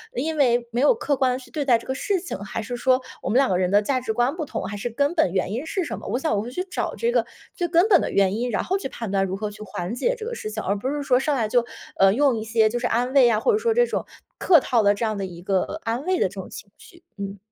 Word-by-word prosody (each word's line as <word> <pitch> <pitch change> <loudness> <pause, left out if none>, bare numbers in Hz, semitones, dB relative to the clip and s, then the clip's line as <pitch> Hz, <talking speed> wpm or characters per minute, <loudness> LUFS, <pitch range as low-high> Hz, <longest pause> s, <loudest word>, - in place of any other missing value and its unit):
因 315 -3 -2
为 240 -3 +2
没 240 - -1
有 370 +11 +5
客 290 -10 -1
观 255 -2 +2
地 - - -2
去 260 - -13
对 300 -2 -2
待 240 -4 +5
这 - - -12
个 265 - -2
事 - - -7 0.2
情？ 355 - -5
还 225 - -4
是 245 +3 -5
说 255 +1 +2 0.2
我 - - -4
们 235 - 0
两 270 -1 +4
个 180 - +2
人 180 -1 +1
的 205 +1 +5
价 255 +4 0
值 235 -3 -3
观 245 +5 +1
不 310 - -3
同？ - - -4
还 205 - -5
是 240 +4 -3
根 280 +7 0
本 190 - +2
原 185 0 0
因 250 +8 -3
是 370 +2 -2
什 - - -5
么？ - - -10
我 - - -1
想 295 -6 0
我 200 - 0
会 235 - -6
去 365 +7 -3
找 380 - -4
这 470 +1 0
个 - - +2 0.3
最 350 -2 -1
根 340 +5 +4
本 370 -5 +7
的 - - -2
原 195 0 +2
因， 245 +1 -1
然 - - 0
后 380 +2 0
去 385 - -4
判 225 -6 -6
断 195 -1 +2
如 190 0 -3
何 210 +1 -3
去 210 +1 -13
缓 180 0 -5
解 - - 0
这 440 - -7
个 475 - -4
事 215 - -5
情， 220 - -4
而 200 - 0
不 255 +6 -3
是 290 0 -2
说， 255 -2 +3
上 285 +1 0
来 225 -4 0
就， 240 -1 +2 0.3
呃 195 0 +5
用 265 -2 +2
一 220 - -4
些 220 -1 +3
就 240 +2 -2
是 245 - 0
安 245 +3 0
慰 270 -3 +6
呀， 225 -3 +3
或 - - +3
者 425 - +3
说 455 0 +1
这 485 +1 +4
种 - - -3 0.3
客 340 -5 +5
套 235 -4 +2
的 205 0 +5
这 205 - -4
样 215 -2 -2
的 195 - -3
一 175 -2 -9
个 190 0 +1
呃 - - -6
安 235 +5 -2
慰 370 0 +1
的 - - +2
这 - - -15
种 - - -7
情 - - -10
绪， 340 -2 -18
嗯。 200 0 -5
245 Hz, 355 characters per minute, -23 LUFS, 215-295 Hz, 0.3 s, 本